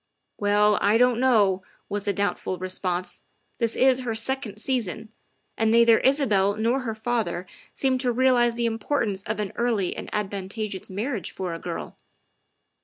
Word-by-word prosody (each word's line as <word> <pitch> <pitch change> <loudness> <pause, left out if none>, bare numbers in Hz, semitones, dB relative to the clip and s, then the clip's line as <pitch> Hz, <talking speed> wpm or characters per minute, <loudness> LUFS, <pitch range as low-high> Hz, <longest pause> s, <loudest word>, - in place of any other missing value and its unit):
' - - -53
' - - -52
" - - -53
Well, 210 0 +4
I 205 +2 +4
don't 245 -1 +3
know," 210 -7 +3 0.3
was 205 0 -4
the 205 - +2
doubtful 200 -1 -2
response, 185 -1 -3 0.2
" - - -46
this 230 -2 0
is 260 -1 +4
her 240 -3 -3
second 225 -2 -2
season, 220 -3 -3 0.5
and 225 0 +1
neither 230 0 +6
Isabel 215 -8 +3
nor 230 +4 +1
her 230 -4 -4
father 220 -6 -2 0.3
seem 260 -1 +1
to 250 -1 +1
realize 240 -1 +3
the 235 0 -1
importance 225 -3 -1
of 215 +1 -4
an 205 -2 -2
early 225 -6 0
and - - -7
advantageous 200 0 -4
marriage 210 +3 -3
for 180 -3 -4
a 165 - -6
girl. 175 -1 -6
220 Hz, 175 wpm, -25 LUFS, 200-245 Hz, 0.5 s, neither